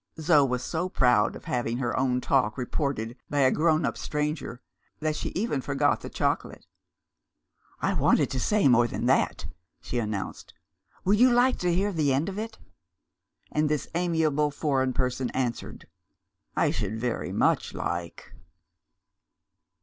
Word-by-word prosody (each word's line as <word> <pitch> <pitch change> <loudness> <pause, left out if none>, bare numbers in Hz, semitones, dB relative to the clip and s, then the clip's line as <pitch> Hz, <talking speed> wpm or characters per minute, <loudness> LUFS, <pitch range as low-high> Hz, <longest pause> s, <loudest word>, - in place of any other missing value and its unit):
Zo 155 -2 +5
was 125 -2 -1
so 175 +2 -2
proud 125 -9 +3
of - - -10
having 120 -1 -1
her 125 -2 -1
own 125 -1 +1
talk 125 -6 +1
reported 125 -3 -2
by 145 -1 +1
a 130 -1 +5
grown 160 0 +2
up - - -1
stranger, 150 -4 -3 0.4
that 155 0 -1
she - - -3
even 185 - -1
forgot 140 +2 +1
the - - -7
chocolate. - - -2 1.2
"I - - +2
wanted - - +2
to 130 - -1
say 210 - +2
more 120 -2 +5
than - - -4
that," - - +1 0.3
she 125 - -3
announced. 105 -4 -5 0.5
"Would 205 +3 +3
you 255 +1 +7
like 245 +2 +3
to 180 -1 +1
hear 195 +4 +1
the 150 -5 +1
end 150 +8 0
of 200 +1 -5
it?" 225 +1 -6 0.9
And 150 0 +1
this 150 -2 -1
admirable 160 -4 +1
foreign 135 -3 0
person 125 0 -1
answered, 125 -3 -3 0.7
"I - - +2
should 105 +2 -3
very 120 0 -2
much - - +1
like." 85 -1 -5
140 Hz, 150 wpm, -27 LUFS, 125-160 Hz, 1.2 s, you